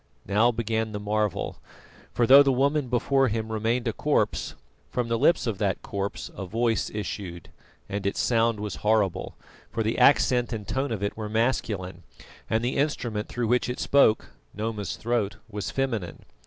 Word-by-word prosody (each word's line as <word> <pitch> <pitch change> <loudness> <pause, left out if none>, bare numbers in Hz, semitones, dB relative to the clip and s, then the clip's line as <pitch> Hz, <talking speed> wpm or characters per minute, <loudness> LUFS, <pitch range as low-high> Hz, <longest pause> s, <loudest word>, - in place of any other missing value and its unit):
Now 110 +4 +3
began 110 -1 -2
the 105 - -3
marvel; 105 -1 -1 0.5
for, 120 - +2
though 135 +4 +9
the 140 -1 +4
woman 140 +2 +1
before 130 +2 +2
him 110 -1 -2
remained 115 +3 0
a 115 - 0
corpse, - - 0 0.3
from 125 -2 -2
the 115 -1 0
lips 170 - +3
of 110 -5 -2
that 100 -2 -1
corpse 100 0 -4
a 95 - -6
voice 115 +2 0
issued, 100 -4 -5 0.4
and 100 0 -4
its 100 - -2
sound 115 -2 +2
was 105 -2 -4
horrible, 105 -3 0 0.3
for 115 -1 -2
the 110 +3 -1
accent 125 -2 +4
and 105 -3 -5
tone 135 +3 -1
of 105 -3 -3
it 100 - -2
were 110 -1 -5
masculine, 105 -6 -1 0.5
and 110 +1 +1
the 125 - -1
instrument 120 -7 -1
through 120 -2 -2
which 125 +1 +2
it 125 - -4
spoke 140 -6 +3 0.3
Noma's 105 -1 -3
throat 115 -3 -1
was 105 -2 -4
feminine. 115 -10 -3
110 Hz, 170 wpm, -26 LUFS, 105-120 Hz, 0.5 s, though